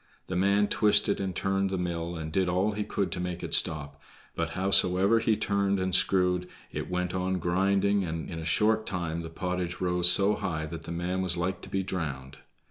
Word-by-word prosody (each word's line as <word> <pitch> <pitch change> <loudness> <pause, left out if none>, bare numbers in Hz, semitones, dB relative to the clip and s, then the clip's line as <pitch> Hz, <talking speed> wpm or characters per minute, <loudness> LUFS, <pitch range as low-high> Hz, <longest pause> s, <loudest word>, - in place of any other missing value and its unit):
The 95 - -5
man 100 +3 +2
twisted 105 -1 +2
and 95 -2 -3
turned 95 0 0
the 95 - -2
mill 85 -1 -3
and 80 -1 -6
did 95 +1 +1
all 95 +4 +1
he 105 0 -3
could 100 -1 -2
to - - -4
make 90 -1 -4
it - - -4
stop, 70 -2 0 0.3
but 85 0 -2
howsoever 95 +3 +3
he 110 -1 +1
turned 100 -2 0
and 95 0 -2
screwed, 90 -1 +3 0.2
it - - -5
went 90 0 -2
on 95 0 -1
grinding, 95 +3 +1
and 80 -2 -4
in 80 - -6
a - - -6
short 110 +6 +2
time 85 -3 -3
the 80 - -7
pottage 90 +1 -4
rose 90 -1 +6
so 100 +3 +3
high 85 -7 -3
that 80 +1 -8
the - - -6
man 90 +2 -2
was 90 -2 -1
like 90 +2 -2
to - - -8
be 95 0 -1
drowned. 70 -8 -5
90 Hz, 210 wpm, -28 LUFS, 85-100 Hz, 0.3 s, rose